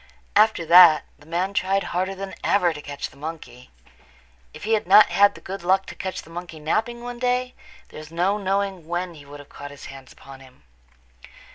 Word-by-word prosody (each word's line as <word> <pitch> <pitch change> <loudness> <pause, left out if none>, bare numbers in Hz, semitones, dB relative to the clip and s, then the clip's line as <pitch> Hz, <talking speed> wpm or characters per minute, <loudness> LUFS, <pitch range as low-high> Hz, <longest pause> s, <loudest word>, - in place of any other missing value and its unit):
After 210 -5 +3
that 170 -2 +8 0.2
the 145 - -19
man 180 +4 -2
tried 195 0 0
harder 185 +2 -2
than 195 0 -7
ever 180 -4 +2
to 150 - -9
catch 145 -1 -7
the - - -20
monkey. 155 - -9 0.8
If - - -12
he 225 - 0
had 215 -5 0
not 205 +3 +7
had 205 0 +4
the - - -13
good 195 +1 -7
luck 190 +2 +2
to - - -9
catch 190 -1 -5
the 165 - -16
monkey 170 -1 -8
napping 225 +10 -2
one 245 0 -7
day 250 0 -1 0.4
there - - -10
is 155 0 -12
no 185 +5 0
knowing 195 -3 -2
when 175 +1 -3
he 145 -3 -14
would 145 +1 -11
have 145 - -14
got 145 - -10
his 145 -1 -12
hands 135 -1 -13
upon 135 -1 -14
him. 130 -1 -19
180 Hz, 210 wpm, -23 LUFS, 155-195 Hz, 0.8 s, that